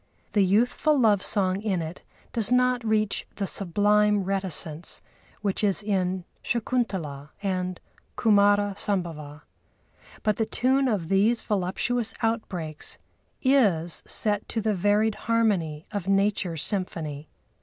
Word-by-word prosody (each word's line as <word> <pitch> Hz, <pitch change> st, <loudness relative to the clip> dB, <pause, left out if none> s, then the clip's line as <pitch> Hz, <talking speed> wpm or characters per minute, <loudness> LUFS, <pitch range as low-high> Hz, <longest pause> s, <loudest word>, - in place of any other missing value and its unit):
The 205 Hz, -, +3 dB
youthful 245 Hz, +9 st, +2 dB
love 210 Hz, -5 st, +4 dB
song 190 Hz, -1 st, 0 dB
in 200 Hz, -4 st, 0 dB
it 165 Hz, +1 st, -6 dB, 0.3 s
does 225 Hz, -1 st, +1 dB
not 250 Hz, -1 st, +3 dB
reach 215 Hz, -2 st, 0 dB
the 200 Hz, -, -2 dB
sublime 205 Hz, +2 st, +2 dB
reticence 180 Hz, -4 st, -3 dB, 0.4 s
which 200 Hz, +1 st, -1 dB
is 200 Hz, 0 st, +2 dB
in 185 Hz, -3 st, -1 dB, 0.2 s
Shakuntalâ 190 Hz, -, -2 dB
and 185 Hz, -2 st, -2 dB, 0.4 s
Kumâra 205 Hz, -1 st, +4 dB
Sambhava. 160 Hz, -6 st, -3 dB, 0.8 s
But 215 Hz, -1 st, +1 dB
the 225 Hz, -, 0 dB
tune 265 Hz, +2 st, +2 dB
of 200 Hz, -9 st, -1 dB
these 210 Hz, +5 st, +3 dB
voluptuous 210 Hz, +4 st, -1 dB
outbreaks 180 Hz, -9 st, -2 dB, 0.5 s
is 200 Hz, -, +3 dB
set 205 Hz, -1 st, 0 dB
to 230 Hz, -, -1 dB
the 215 Hz, 0 st, +1 dB
varied 205 Hz, +3 st, +2 dB, 0.2 s
harmony 185 Hz, -10 st, +1 dB
of 200 Hz, -4 st, -4 dB
Nature's 195 Hz, -5 st, +1 dB
symphony. 155 Hz, -7 st, -3 dB
200 Hz, 120 wpm, -26 LUFS, 180-220 Hz, 0.8 s, love